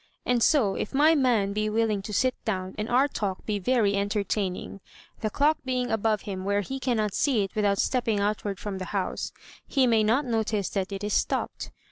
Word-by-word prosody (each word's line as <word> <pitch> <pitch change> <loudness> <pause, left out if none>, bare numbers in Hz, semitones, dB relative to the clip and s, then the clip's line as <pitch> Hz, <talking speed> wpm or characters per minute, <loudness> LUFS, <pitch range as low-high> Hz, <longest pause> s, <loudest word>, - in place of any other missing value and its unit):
And 245 -1 +2
so, 230 -8 +4
if 210 - -4
my 305 +3 +6
man 240 -9 +2
be 215 +1 0
willing 215 -2 +1
to 205 - -7
sit 255 +5 +2
down, 190 -4 -2
and 210 +1 -4
our 260 +4 +4
talk 200 -8 -4
be 210 -2 -1
very 215 0 +2
entertaining, 200 -1 -2 0.4
the 215 - -1
clock 295 +7 +2
being 250 -1 -1
above 220 -1 +1
him 190 -2 -5
where 200 +1 +1
he 270 +7 -5
cannot 220 -6 0
see 250 -4 +2
it 195 - -6
without 205 -2 +1
stepping 230 -4 +1
outward 205 -1 -1
from 200 -2 -5
the 185 - -4
house, 190 - -2 0.4
he 270 -2 +3
may 225 -3 +3
not 240 +7 +2
notice 220 -4 -1
that 195 -1 -2
it 195 +1 -5
is 210 - -1
stopped. - - -1
215 Hz, 200 wpm, -27 LUFS, 200-245 Hz, 0.4 s, my